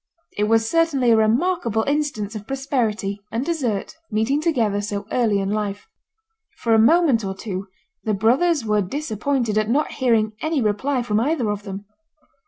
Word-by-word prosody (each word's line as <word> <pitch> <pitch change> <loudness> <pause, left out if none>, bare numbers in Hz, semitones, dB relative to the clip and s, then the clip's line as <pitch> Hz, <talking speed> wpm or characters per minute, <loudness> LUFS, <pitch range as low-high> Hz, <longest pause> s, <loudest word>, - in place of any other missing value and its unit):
It 210 - +1
was 225 +1 +2
certainly 290 -6 +2
a - - +6
remarkable 225 - +1
instance 280 -8 -1
of 210 -1 -8
prosperity 225 -7 -2
and 235 +4 -2
desert 270 -7 -2
meeting 225 +7 +1
together 230 - +1
so 205 0 -4
early 225 -5 +2
in 195 0 -1
life. 205 -1 -3 0.7
For 230 - +1
a 220 - +5
moment 275 -1 +4
or 190 -1 -3
two 195 -1 -5 0.4
the 215 -2 0
brothers 260 - +2
were 210 -1 +2
disappointed 230 0 -1
at 215 0 -1
not 290 +6 +1
hearing 225 -4 +1
any 315 -1 0
reply 245 +4 0
from 210 -2 0
either 250 -3 0
of 205 0 -5
them. 195 0 -6
225 Hz, 165 wpm, -22 LUFS, 210-275 Hz, 0.7 s, a